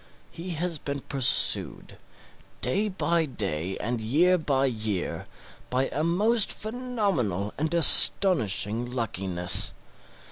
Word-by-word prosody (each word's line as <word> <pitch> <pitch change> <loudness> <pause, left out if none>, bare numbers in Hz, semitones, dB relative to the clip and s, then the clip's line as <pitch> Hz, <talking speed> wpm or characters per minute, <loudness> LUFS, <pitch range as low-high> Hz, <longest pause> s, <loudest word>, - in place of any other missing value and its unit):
He 170 +2 -9
has 170 -1 -4
been 140 0 -6
pursued, 135 -2 -2 0.6
day 200 +13 0
by 170 -4 -2
day 95 - -3
and 120 0 -4
year 160 +12 +1
by 135 -3 -1
year, 110 -7 -4 0.4
by 130 +1 -2
a 150 - -4
most 205 +6 +3
phenomenal 200 - -3
and 155 +1 -2
astonishing 120 - +5
luckiness. 95 -7 -1
140 Hz, 105 wpm, -25 LUFS, 110-180 Hz, 0.6 s, astonishing